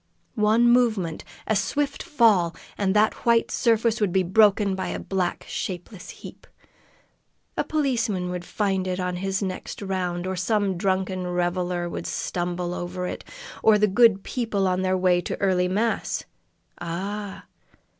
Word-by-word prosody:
One 220 +2 +3
movement, 220 -9 +2 0.2
a 220 - +1
swift 280 +8 -1
fall, 205 - +3 0.2
and 195 -1 0
that 215 +1 +2
white 235 -1 +3
surface 230 0 +2
would 205 -4 +2
be 190 +1 +2
broken 200 +1 +4
by 190 0 -3
a - - -3
black 185 -2 -2
shapeless 180 +1 -6
heap. - - -11 1.1
A - - 0
policeman 230 -12 0
would 180 -1 -4
find 190 -1 -1
it 185 0 -2
on 180 -1 -2
his 195 +2 -2
next 185 -1 -5
round, 185 -3 -2
or 190 0 -2
some 195 +1 0
drunken 185 0 -1
reveler 175 0 -1
would - - -5
stumble 175 0 -2
over 180 +1 -4
it, - - -5 0.4
or 220 -1 +6
the 210 - +4
good 210 0 +4
people 220 -6 -1
on 185 0 +1
their 185 0 +1
way 180 -1 +3
to - - -5
early 185 -2 +2
mass 215 +5 -1 0.6
ah! 195 +4 -5
190 Hz, 150 wpm, -25 LUFS, 180-215 Hz, 1.1 s, or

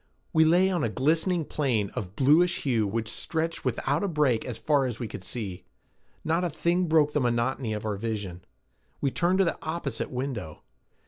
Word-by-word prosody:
We 160 0 +5
lay 180 +4 +4
on 175 -4 0
a 115 - +1
glistening 160 - +1
plain 120 -11 0
of 95 -1 -6
bluish 160 +6 +3
hue 115 -6 +1
which 110 +2 -2
stretched 160 +7 -2
without 135 - 0
a - - +1
break 150 -9 +1
as 125 - -4
far 145 -3 +2
as 120 -3 -4
we 120 - -4
could 95 - -8
see. 100 -4 -4 0.6
Not 165 +3 +1
a 175 - 0
thing 175 +2 0
broke 155 -2 +3
the 150 - +1
monotony 120 -1 0
of 105 0 -4
our 105 -2 -1
vision. 100 -5 -4 0.6
We 140 - 0
turned 180 +4 +1
to 195 - +4
the 170 - -2
opposite 155 -7 -3
window. 125 - -5
135 Hz, 190 wpm, -27 LUFS, 110-165 Hz, 0.6 s, We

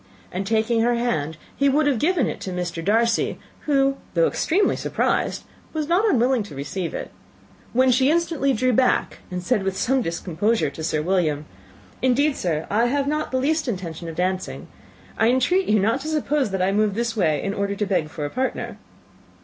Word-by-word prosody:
And, 190 +2 -3
taking 225 +1 +2
her 240 +1 +2
hand, 160 -11 -1 0.2
he 280 0 +3
would 295 +3 +3
have 280 -5 +2
given 320 -2 +2
it - - -4
to 190 - -4
Mr. 175 -2 -3
Darcy, 230 +4 +2 0.3
who, 275 -1 +3 0.2
though - - +4
extremely 400 -4 +1
surprised, - - -1 0.3
was 310 -2 -2
not 380 +7 +3
unwilling 250 - +3
to 200 -8 -8
receive 165 +6 -4
it, - - -5 0.6
when 255 +1 +4
she 260 +2 +3
instantly 325 -4 +1
drew 255 +1 +1
back, 255 +2 +2
and 180 -1 -4
said 190 +3 +1
with 190 0 -2
some 265 +5 +2
discomposure 185 +4 0
to 160 - -8
Sir 155 -1 0
William, 160 -5 0 0.6
"Indeed, 275 +3 +2
sir, 160 -3 -1
I 225 +4 +3
have 280 +2 0
not 305 +1 -1
the 260 - -1
least 300 +3 0
intention 175 -6 -4
of 160 - -7
dancing. 185 +1 -2 0.5
I 225 - +4
entreat 310 +10 +2
you 215 - +4
not 225 +7 +1
to 300 - -6
suppose 300 -4 0
that 190 -1 -1
I 190 - +2
moved 210 0 +1
this 235 0 -1
way 160 -8 +1
in 195 - -1
order 200 0 -1
to 210 - -1
beg 180 -6 0
for 155 -2 -5
a 145 - -4
partner." 260 +1 -3
225 Hz, 195 wpm, -23 LUFS, 185-270 Hz, 0.6 s, though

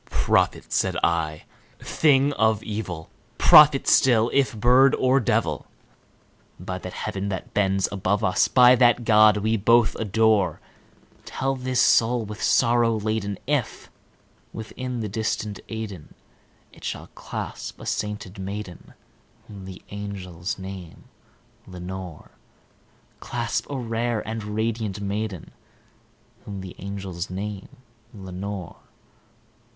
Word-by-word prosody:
"Prophet!" - - +1
said - - +1
I, 80 -2 0 0.3
"thing 145 -2 +2
of 110 -3 +1
evil 95 -7 -5 0.3
prophet 150 -2 +7
still, 120 -3 +4
if 135 -5 +1
bird 125 +4 +5
or 130 +1 +3
devil! 120 - -1 0.9
By 90 +1 -5
that 90 0 -8
Heaven 100 +1 -4
that 95 -2 -5
bends 95 -2 +1
above, 100 +1 -1
us 90 - +3
by 125 -1 +6
that 120 -1 +4
God 110 -1 +6
we 110 +2 0
both 115 +2 +3
adore 105 -4 +2 0.6
Tell 135 0 -2
this 130 -1 -2
soul 115 0 +3
with 105 +1 -8
sorrow 115 -2 +3
laden 105 -2 -2
if, 140 -5 -2 0.6
within 125 +2 -6
the 110 - -3
distant 105 -1 -3
Aidenn, 105 -8 -7 0.6
It - - -17
shall - - -5
clasp - - -7
a - - -10
sainted 105 -2 -4
maiden 95 -2 -7 0.5
whom 100 -3 -10
the 95 -1 -10
angels 100 -3 -5
name 95 -3 -9 0.6
Lenore 90 -2 -8 0.9
Clasp 120 -1 -3
a 140 - -3
rare 115 -2 -2
and 110 0 -4
radiant 110 -1 -2
maiden 100 -2 -4 0.9
whom 100 -2 -6
the 95 -1 -9
angels 95 -2 -5
name 100 +1 -6 0.5
Lenore." 95 -1 -7
105 Hz, 115 wpm, -24 LUFS, 95-115 Hz, 0.9 s, prophet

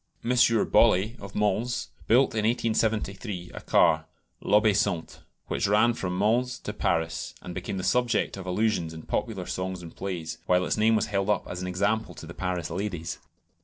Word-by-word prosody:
M. 120 - +1
Bollée, 115 -2 +4
of 100 -1 -10
Mans, 105 +4 0 0.2
built 130 +4 +4
in 110 -1 0
1873 110 -4 -1
a - - -7
car, - - +3 0.4
"l'Obéissante," 105 -4 +2 0.3
which - - -1
ran 105 +4 +4
from 90 -5 -3
Mans 120 +5 +1
to 105 - -6
Paris; 80 -5 -1
and 90 - -6
became 95 +2 -4
the 95 - -3
subject 125 +2 +1
of 95 -1 -8
allusions 90 -4 0
in 80 - -9
popular - - -2
songs 95 -1 -4
and 85 - -10
plays, 85 -4 -5
while 90 0 +3
its - - 0
name 110 +1 +3
was 110 0 +2
held 100 +1 0
up 105 - +1
as 90 - -5
an 90 - -3
example 100 +5 -1
to - - -9
the - - -9
Paris 90 -3 -3
ladies. 90 -4 -4
100 Hz, 175 wpm, -27 LUFS, 90-110 Hz, 0.4 s, Bollée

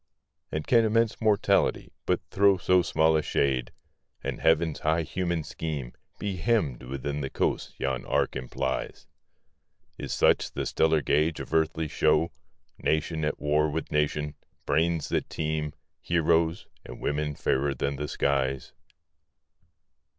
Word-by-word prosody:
And 80 -1 -3
can 115 -2 +5
immense 115 +1 +1
Mortality 110 -2 +2 0.2
but - - +2
throw 100 -1 +4
So 90 0 +3
small 80 -1 +2
a 80 - +3
shade, 65 -4 0 0.5
and - - -3
Heaven's 80 -1 +2
high 80 +2 +1
human 85 -1 -2
scheme 75 -5 -5 0.2
Be 100 -3 -3
hemmed 90 - +1
within 70 +3 -4
the 70 - -3
coasts - - -1
yon 65 -2 -2
arc - - +1
implies? 65 0 -3 0.9
Is - - -5
such - - +2
the - - -2
stellar 80 -2 +2
gauge 75 +1 +1
of - - -7
earthly 80 0 +1
show, 80 +2 +2 0.5
Nation 80 +1 0
at 75 - -1
war 75 +1 +2
with 80 +2 -4
nation, 75 0 0 0.3
brains 80 +1 +1
that - - -1
teem, 75 -1 -2 0.3
Heroes, 85 0 +1 0.2
and - - -10
women 75 0 -1
fairer 70 +1 0
than 70 0 -2
the 75 +2 -3
skies? 70 -2 -1
80 Hz, 135 wpm, -27 LUFS, 70-85 Hz, 0.9 s, can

